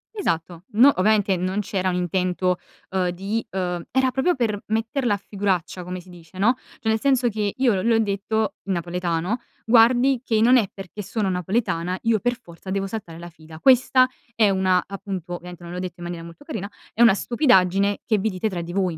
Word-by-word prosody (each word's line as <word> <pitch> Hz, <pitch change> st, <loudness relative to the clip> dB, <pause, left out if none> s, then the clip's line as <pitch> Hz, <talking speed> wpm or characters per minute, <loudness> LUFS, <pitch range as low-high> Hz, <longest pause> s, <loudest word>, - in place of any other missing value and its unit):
Esatto, 170 Hz, -, -2 dB
no 240 Hz, +6 st, +7 dB
ovviamente 205 Hz, 0 st, +3 dB
non 185 Hz, +3 st, -1 dB
c'era 190 Hz, -2 st, -1 dB
un 180 Hz, -, -1 dB
intento, 180 Hz, 0 st, 0 dB, 0.3 s
uhm, 185 Hz, -1 st, +1 dB
di 195 Hz, +6 st, -3 dB
uhm, 180 Hz, -2 st, -3 dB
era 260 Hz, 0 st, +2 dB
proprio 270 Hz, +8 st, +1 dB
per 215 Hz, -5 st, -1 dB
metterla 225 Hz, +2 st, 0 dB
a -, -, -5 dB
figuraccia 190 Hz, -3 st, -2 dB
come 180 Hz, +1 st, -5 dB
si 185 Hz, -, -18 dB
dice, 175 Hz, 0 st, -14 dB
no, 220 Hz, +6 st, +4 dB, 0.3 s
cioè, 230 Hz, -4 st, -2 dB
nel 220 Hz, -, +1 dB
senso 260 Hz, -2 st, +2 dB
che 210 Hz, -2 st, -1 dB
io 255 Hz, -4 st, +3 dB
l -, -, -5 dB
le 230 Hz, +1 st, +3 dB
ho -, -, +4 dB
detto, 210 Hz, 0 st, -1 dB
in 195 Hz, -, -1 dB
napoletano: 175 Hz, +4 st, -2 dB, 0.3 s
"Guardi 245 Hz, +3 st, +5 dB
che 220 Hz, -3 st, +1 dB
non 250 Hz, +3 st, +6 dB
è 215 Hz, -6 st, +1 dB
perché 195 Hz, +1 st, -8 dB
sono 205 Hz, 0 st, -2 dB
napoletana, 180 Hz, -1 st, -1 dB
io 225 Hz, -1 st, +2 dB
per 245 Hz, +3 st, 0 dB
forza 170 Hz, +2 st, -12 dB
devo 195 Hz, +1 st, -1 dB
saltare 195 Hz, -5 st, -6 dB
la 170 Hz, +1 st, -9 dB
fila. 160 Hz, -1 st, -14 dB
Questa 255 Hz, +1 st, +5 dB, 0.3 s
è 215 Hz, -3 st, +4 dB
una" 185 Hz, -1 st, +2 dB
appunto 195 Hz, -3 st, -6 dB
ovviamente 175 Hz, 0 st, -10 dB
non 170 Hz, -, -8 dB
l'ho 180 Hz, -, -4 dB
detto 180 Hz, -1 st, -5 dB
in 175 Hz, -, -9 dB
maniera 175 Hz, -1 st, -5 dB
molto 170 Hz, +10 st, -13 dB
carina: 210 Hz, -, -5 dB, 0.2 s
"...è 230 Hz, -, -1 dB
una 235 Hz, -4 st, +8 dB
stupidaggine 200 Hz, -, +2 dB
che 215 Hz, -, +2 dB
vi 220 Hz, +3 st, 0 dB
dite 195 Hz, +2 st, -2 dB
tra 175 Hz, -3 st, -4 dB
di 170 Hz, +1 st, -7 dB
voi, 185 Hz, -4 st, 0 dB
195 Hz, 210 wpm, -23 LUFS, 180-225 Hz, 0.3 s, una